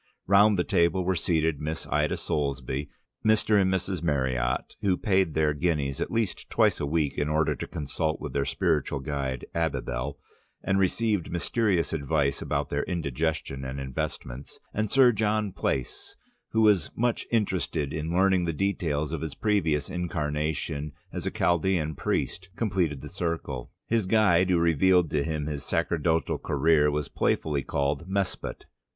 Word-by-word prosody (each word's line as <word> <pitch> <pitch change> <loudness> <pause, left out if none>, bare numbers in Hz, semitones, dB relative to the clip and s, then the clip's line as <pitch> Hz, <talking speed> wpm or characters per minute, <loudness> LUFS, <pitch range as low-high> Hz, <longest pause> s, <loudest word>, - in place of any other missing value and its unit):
Round 100 +2 +5
the 90 - +2
table 85 +2 +2
were 95 +1 +1
seated 80 -3 0
Miss 80 +2 -3
Ida - - +1
Soulsby, 70 -1 -2 0.3
Mr. 110 -1 +4
and 95 0 +2
Mrs. 95 -2 -1
Meriott 65 -5 0
(who 95 -3 +2
paid 95 -6 +1
their 75 -1 +2
guineas 75 -3 -1
at - - -1
least 115 -4 -2
twice - - +3
a 70 - -1
week 75 -2 0
in 75 0 0
order 80 0 +2
to - - -6
consult 80 +1 -2
their 70 - +1
spiritual 70 - 0
guide 70 -3 -3
Abibel 70 -4 -2 0.5
and 95 0 +1
received 100 0 +1
mysterious 90 0 0
advice 70 -2 0
about - - -2
their - - +1
indigestion 80 -4 -2
and 65 +1 -5
investments), 65 0 -5
and 110 0 -1
Sir 130 0 +6
John 105 -1 0
Plaice, 65 -7 -3 0.3
who 110 - +1
was 100 -9 +4
much 120 0 0
interested 95 - 0
in 80 +1 -3
learning 95 0 +3
the 85 - -1
details 80 -5 -1
of 80 - -3
his 80 -3 -4
previous 80 -9 +1
incarnation 75 -3 -2 0.2
as - - -3
a - - -1
Chaldean 85 -2 +1
priest, 95 +6 -2
completed 90 - 0
the - - -7
circle. 80 -7 -3 0.2
His 115 -4 0
guide, 95 -4 +4
who 90 - +4
resealed 85 +1 +3
to 75 -2 +1
him 75 -2 -2
his 75 -2 -4
sacerdotal 80 +2 0
career, 80 -2 +3
was 75 -1 -1
playfully 75 -3 0
called 70 +4 -1
Mespot. 95 -1 -3
80 Hz, 155 wpm, -27 LUFS, 75-95 Hz, 0.5 s, Sir